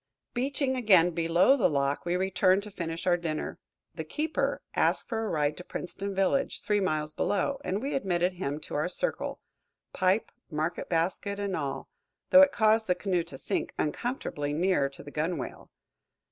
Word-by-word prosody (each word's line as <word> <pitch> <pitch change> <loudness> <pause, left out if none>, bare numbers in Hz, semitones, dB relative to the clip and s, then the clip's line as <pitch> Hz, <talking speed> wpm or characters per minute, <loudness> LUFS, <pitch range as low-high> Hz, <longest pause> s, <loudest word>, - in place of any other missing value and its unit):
Beaching 265 +1 0
again, 190 -8 +5
below 170 +9 +4
the 250 - +3
lock, 140 +2 0
we 175 - +1
returned 190 +1 +2
to 210 - -9
finish 165 -3 -4
our 175 -1 +4
dinner. 160 -3 -4 0.3
The - - -5
keeper 310 +1 -1
asked - - +2
for 225 -2 -2
a 220 - -2
ride 150 -1 +1
to 180 - -7
Princeton 195 +3 -5
village, 195 +9 +1
three 210 -1 +2
miles 155 -5 -1
below, 270 - 0
and 195 +5 -2
we 280 - -2
admitted 180 -7 +1
him 150 -5 -3
to - - -9
our 150 +3 0
circle, - - -2 0.5
pipe, 190 +3 +1 0.2
market 155 +1 -2
basket 180 +4 0
and 200 -2 -1
all, 140 -3 -3 0.4
though 280 - +10
it 285 0 +7
caused 220 0 +3
the 180 - +3
canoe 180 -1 0
to 145 -6 -9
sink - - -2
uncomfortably 150 - -2
near 165 -3 +2
to 135 - -11
the 145 - -10
gunwale. 155 -1 -3
185 Hz, 175 wpm, -29 LUFS, 160-210 Hz, 0.5 s, though